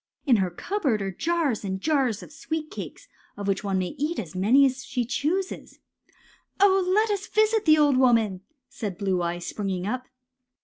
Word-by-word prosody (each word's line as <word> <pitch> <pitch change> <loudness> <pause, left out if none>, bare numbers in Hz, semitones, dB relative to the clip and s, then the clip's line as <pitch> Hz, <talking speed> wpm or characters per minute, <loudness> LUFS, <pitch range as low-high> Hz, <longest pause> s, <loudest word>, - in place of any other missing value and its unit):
In 250 -6 +5
her 190 -2 +1
cupboard 270 - -1
are 195 - -3
jars 310 - -1
and 190 -1 -3
jars 265 -4 0
of - - -13
sweet 315 0 -5
cakes, - - -8 0.3
of 200 -1 -5
which 195 0 0
one 195 -2 0
may 185 -1 -2
eat 310 +4 -1
as 170 -8 -5
many 225 +10 +4
as 265 0 -1
she 250 -2 -2
chooses." 330 +10 -2 0.3
'^ - - -32 0.4
Oh, 385 -1 +5
let 430 +3 +3
us 405 +1 -2
visit 435 0 +2
the 310 0 +6
old 290 -3 +4
woman," 230 -7 +3 0.3
said 220 -8 -6
Blue 190 -3 0
Eyes, 175 0 -3
springing 190 -3 -3
up. 255 +5 -3
255 Hz, 185 wpm, -25 LUFS, 195-320 Hz, 0.4 s, the